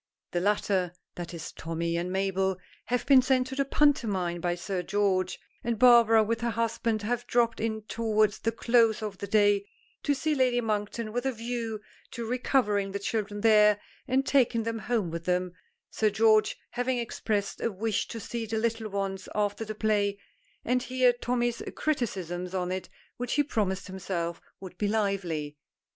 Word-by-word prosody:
The 175 - 0
latter 190 -2 +1 0.2
(that 175 -1 -6
is, 170 -2 -7
Tommy 165 +1 -3
and 175 +2 -2
Mabel) 190 0 0 0.3
have 245 +1 -1
been 270 -2 +7
sent 255 0 +2
to 265 +1 -6
the 275 - +2
pantomime 205 - +1
by 175 0 0
Sir 185 +1 -3
George, 190 -1 0 0.3
and 235 -1 -1
Barbara 230 -2 +7
with 225 +2 -1
her 235 - 0
husband 230 -1 -1
have 240 +2 -2
dropped 235 -1 +2
in 220 -1 -2
towards 215 -1 +1
the 225 - 0
close 230 -1 +3
of 200 -3 -5
the 200 - -5
day 205 -1 +3 0.3
to 285 - +1
see 310 +3 0
Lady 255 -3 +2
Monkton, 215 0 -2
with 245 +2 -1
a - - +1
view 230 -2 -4 0.3
to 235 - -4
recovering 220 -5 +1
the - - 0
children 205 0 -3
there, 210 -2 +5 0.3
and 265 +2 +2
taking 240 -5 +3
them 225 0 -3
home 220 -7 -1
with 165 0 -5
them, 180 0 0 0.4
Sir 215 - +2
George 215 +1 +3
having 245 +1 -1
expressed 210 -4 -2
a 230 - 0
wish 210 +2 -1
to 230 - -6
see 230 +1 -4
the 220 +1 -2
little 225 -1 -1
ones 195 -1 -3
after 205 +1 0
the 215 0 -6
play, 205 -2 +1 0.5
and 250 +1 +2
hear 255 0 +3
Tommy's 240 -1 -1
criticisms 185 - -2
on 180 -1 -1
it, 185 0 -4 0.3
which 245 0 -3
he 290 - +3
promised 195 -8 -1
himself 180 -3 -4 0.2
would 185 -2 -10
be 210 - +1
lively. 185 -8 -1
215 Hz, 175 wpm, -28 LUFS, 195-235 Hz, 0.5 s, been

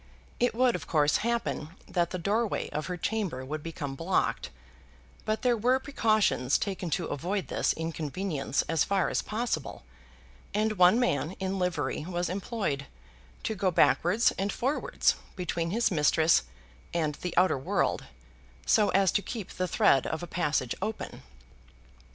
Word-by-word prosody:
It 245 -1 +2
would, 250 0 +3
of 165 -5 -6
course, 150 -2 +3
happen 230 -8 -2
that 175 -2 0
the 185 - -3
doorway 210 +5 -1
of 155 +1 -3
her 180 -1 -3
chamber 180 -9 -2
would 155 +3 -4
become 150 -3 -5
blocked; 165 +7 0 0.8
but 215 +3 -1
there 245 -1 +4
were 245 +4 +3
precautions 215 - +2
taken 190 -3 -3
to 175 - -4
avoid 180 +7 -3
this - - +1
inconvenience 160 -1 -2
as 160 -2 +1
far 195 -2 +1
as - - 0
possible, 215 - -3 0.7
and 215 -1 0
one 180 +6 +6
man 160 - 0
in 190 0 -3
livery 150 -7 -1
was 175 -1 -2
employed 185 - -2 0.6
to - - -1
go 195 -2 +1
backwards 180 +5 +3
and 200 +1 0
forwards 270 +5 +1 0.2
between 170 -3 -2
his 225 +4 +1
mistress 160 0 +4 0.5
and 155 -3 +1
the 180 -1 -4
outer 180 -6 +4
world, 130 - 0 0.6
so 210 -2 +4
as 195 -1 +3
to 205 - +1
keep 215 -2 -6
the 185 - -2
thread 140 -4 +3
of 160 +2 -3
a - - -2
passage 150 -8 -1
open. 215 +2 -4
180 Hz, 150 wpm, -29 LUFS, 160-215 Hz, 0.8 s, one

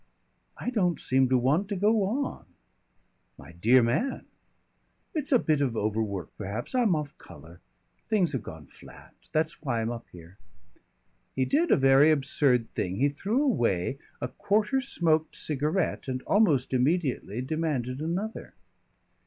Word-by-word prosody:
"I 245 - -3
don't 180 -8 +1
seem 130 0 +2
to 130 - +4
want 150 +11 +1
to 205 - -2
go 210 +3 +2
on." 260 +7 -3 0.9
"My 70 +4 -13
dear 115 +9 +4
man!" 205 - -1 0.9
"It's 300 -3 -2
a 255 - +7
bit 155 -9 +1
of 125 -5 0
overwork 105 -4 -2
perhaps. 105 - -5
I'm 235 -8 +3
off 150 -2 -4
colour. 85 +2 -14 0.5
Things 195 -7 +2
have 130 -6 -2
gone 80 -5 -10
flat. - - -16 0.2
That's 155 0 -1
why 130 -6 -1
I'm 115 +1 -1
up 120 -1 -7
here." 90 +2 -14 1.0
He 130 - +1
did 320 - +1
a - - +5
very 135 +2 +5
absurd 135 -4 +1
thing. 90 0 -2
He 140 +7 +2
threw 205 - -1
away 125 - 0 0.2
a - - -2
quarter 215 +6 0
smoked 160 - 0
cigarette 155 +5 -1
and 130 -1 -3
almost 155 - +2
immediately 130 - 0
demanded 140 -3 -2
another. 185 +8 -4
140 Hz, 145 wpm, -27 LUFS, 120-190 Hz, 1.0 s, a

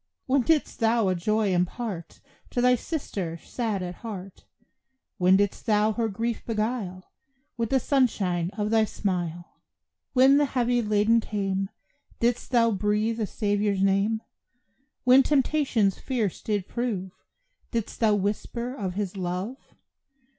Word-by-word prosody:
When 270 +1 +3
didst 305 +4 +1
thou 225 -3 +3
a - - +2
joy 210 +2 +1
impart 180 0 -3 0.3
To - - -2
thy 250 +1 +5
sister, 210 - -3
sad 215 0 -3
at 175 -1 -6
heart! 195 -5 -8 0.7
When 185 +1 +5
didst 205 +3 -1
thou 210 0 +3
her 225 +1 -1
grief 230 +3 -3
beguile 215 -5 -3 0.4
With 230 -1 -2
the 265 - +3
sunshine 200 - +1
of 210 0 -1
thy 225 -1 +4
smile? 175 -5 -4 0.5
When 265 +2 +6
the 290 - +4
heavy 245 -2 +1
laden 215 +1 +3
came 195 -3 -2 0.5
Didst 240 +1 0
thou 230 -2 +4
breathe 210 +3 0
a 215 - 0
Saviour's 205 -2 0
name? 200 +3 +2 0.8
When 255 +1 +7
temptations 270 -7 +2
fierce 230 -8 -2
did 205 -3 -2
prove 215 -7 -3 0.6
Didst 230 -3 -3
thou 215 -2 +4
whisper 215 +5 -2
of 195 -8 -4
His 200 -2 -3
love? 185 +7 -5
215 Hz, 135 wpm, -26 LUFS, 195-240 Hz, 0.8 s, When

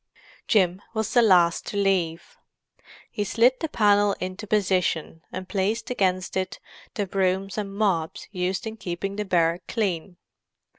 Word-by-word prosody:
Jim 185 -3 +2
was 220 0 -1
the 240 - +6
last 180 -6 +4
to 205 - -4
leave. 185 -4 0 0.8
He 210 - -2
slid 240 +5 +3
the 320 - -2
panel 205 -4 +3
into 185 +4 -5
position, 185 -6 0
and 185 0 -6
placed 205 +6 -1
against 185 -5 0
it 185 0 -2 0.4
the 205 - -1
brooms 190 0 0
and 205 -2 -3
mops 185 -7 -1
used 185 +2 -2
in 220 0 -5
keeping 195 +1 -4
the 210 0 -3
barrack 170 -2 +1
clean. 185 -5 -2
195 Hz, 145 wpm, -25 LUFS, 180-210 Hz, 0.8 s, the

